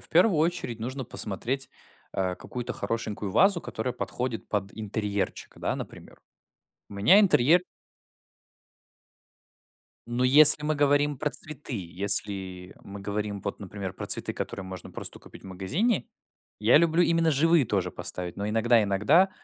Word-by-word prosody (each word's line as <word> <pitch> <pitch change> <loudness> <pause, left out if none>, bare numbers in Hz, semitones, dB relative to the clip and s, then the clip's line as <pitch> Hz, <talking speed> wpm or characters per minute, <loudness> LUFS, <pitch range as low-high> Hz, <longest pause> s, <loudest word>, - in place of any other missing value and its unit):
В - - -15
первую 175 0 +4
очередь 155 -8 -1
нужно 130 +3 -4
посмотреть, 120 +6 -3 0.4
а, 95 -1 -1
какую-то 125 +5 -6
хорошенькую 105 -1 -4
вазу, 190 - +4
которая 120 +3 -4
подходит 125 -3 -4
под 100 -2 -2
интерьерчик, 105 -2 -3
да, - - -2
например. - - -10 0.7
У - - -11
меня 125 - +6
интерьерө 165 -1 +4 2.5
Ну, 120 +1 -1
если 150 +4 +7
мы 155 0 0
говорим 145 0 +2
про 150 - -1
цветы, 150 -4 -8
если 95 0 -1
мы 100 0 -9
говорим 105 0 -3
вот, 100 - -4
например, 100 -1 -6
про - - -7
цветы, - - +1
которые 95 - -5
можно 95 -1 -8
просто - - -7
купить - - -15
в - - -12
магазине, 125 - -1 0.5
я 110 +6 +5
люблю 170 +1 +3
именно 165 -1 +2
живые 165 +1 +4
тоже 95 -4 -1
поставить, 90 -1 -6
но 100 +1 -3
иногда 115 +2 +3
иногда, 135 - +3
115 Hz, 140 wpm, -27 LUFS, 100-150 Hz, 2.5 s, если